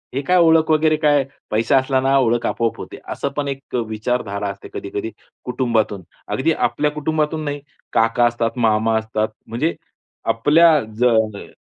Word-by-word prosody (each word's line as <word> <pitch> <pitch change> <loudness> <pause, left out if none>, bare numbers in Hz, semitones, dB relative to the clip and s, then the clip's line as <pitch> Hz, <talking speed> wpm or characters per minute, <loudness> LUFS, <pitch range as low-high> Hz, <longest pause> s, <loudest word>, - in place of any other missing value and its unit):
हे 140 - 0
काय 180 +6 +2
ओळख 160 -2 +4
वगैरे 155 0 +3
काय 145 -2 +3 0.3
पैसा 110 +5 +2
असला 130 0 +1
ना 135 +1 +3
ओळख 120 -2 +1
आपोआप 115 0 -1
होते, - - -8
असं 140 - -3
पण 145 - -1
एक 135 -1 -6
विचारधारा 110 -2 -2
असते 100 0 -9
कधी-कधी 100 +2 -5 0.3
कुटुंबातून. 115 -6 -1 0.2
अगदी - - 0
आपल्या 150 0 0
कुटुंबातून 155 +1 -1
नाही 145 0 -4 0.3
काका 115 +1 +3
असतात, 120 +1 -1
मामा 110 -1 +2
असतात, 110 0 -1 0.2
म्हणजे 130 +9 -1 0.6
आपल्या 155 +6 +5 0.2
ज 125 - +2
अ, 110 -4 +1
125 Hz, 155 wpm, -20 LUFS, 110-150 Hz, 0.6 s, आपल्या